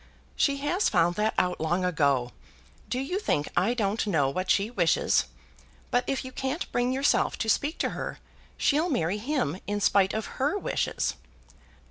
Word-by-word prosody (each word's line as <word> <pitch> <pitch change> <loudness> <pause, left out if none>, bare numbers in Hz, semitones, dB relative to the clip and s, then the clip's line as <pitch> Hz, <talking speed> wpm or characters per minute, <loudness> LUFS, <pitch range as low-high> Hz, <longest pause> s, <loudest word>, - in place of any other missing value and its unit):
"She 280 -1 +2
has 295 +8 +1
found 170 +1 +3
that 215 +1 +1
out 180 0 +1
long 175 +3 0
ago. 140 -8 +1 0.6
Do 250 - -1
you 320 +9 -2
think 150 - 0
I 205 +7 +2
don't 215 -1 0
know 145 -8 +2
what 185 +6 -3
she 205 +3 +2
wishes? 175 -9 +2 0.7
But 245 +1 +2
if 270 -1 -1
you 260 - -7
can't 265 +5 -3
bring 245 +1 +1
yourself 270 +2 +2
to 225 - -2
speak 290 +8 +1
to - - 0
her, - - -5 0.4
she'll 310 +5 +2
marry 195 - 0
him 240 - -1
in 205 0 -1
spite 195 -1 +3
of 220 - -2 0.2
her 290 +9 +2
wishes." - - -1
215 Hz, 170 wpm, -27 LUFS, 180-270 Hz, 0.7 s, found